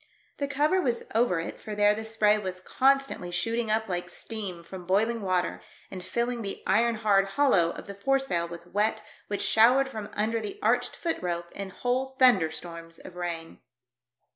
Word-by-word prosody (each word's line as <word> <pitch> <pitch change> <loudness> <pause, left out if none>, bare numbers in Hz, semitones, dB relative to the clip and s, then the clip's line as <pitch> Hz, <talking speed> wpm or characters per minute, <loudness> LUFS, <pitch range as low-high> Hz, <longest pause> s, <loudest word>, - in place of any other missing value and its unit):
The 280 - -1
cover 300 +6 +2
was 245 -6 0
over 225 -6 +2
it, 165 - -6
for 215 - -6
there 205 0 +4
the 220 +1 -5
spray 220 -1 +3
was 185 -2 -4
constantly 270 -2 +1
shooting 225 +5 -1
up 220 +1 +1
like 180 -1 -3
steam 195 -7 -5
from 180 +1 -10
boiling 225 +4 +2
water, 185 -2 -1 0.3
and 185 -2 -7
filling 235 +5 -2
the 200 -2 -5
iron 230 +4 +3
hard 205 -3 +3
hollov/ 195 -13 +3
of - - -8
the 200 - -7
foresail 225 -5 0
with 170 0 -9
wet 210 +4 0 0.2
which 205 - -2
showered 255 +5 +5
from 215 -4 -6
under 225 +2 0
the 210 -2 -6
arched 245 +3 +1
foot 335 -1 -2
rope 170 -1 -3
in 200 -1 -6
whole 255 +6 -2
thunderstorms 170 -7 +2
of 180 - -12
rain. 170 -2 -5
210 Hz, 175 wpm, -28 LUFS, 180-235 Hz, 0.3 s, showered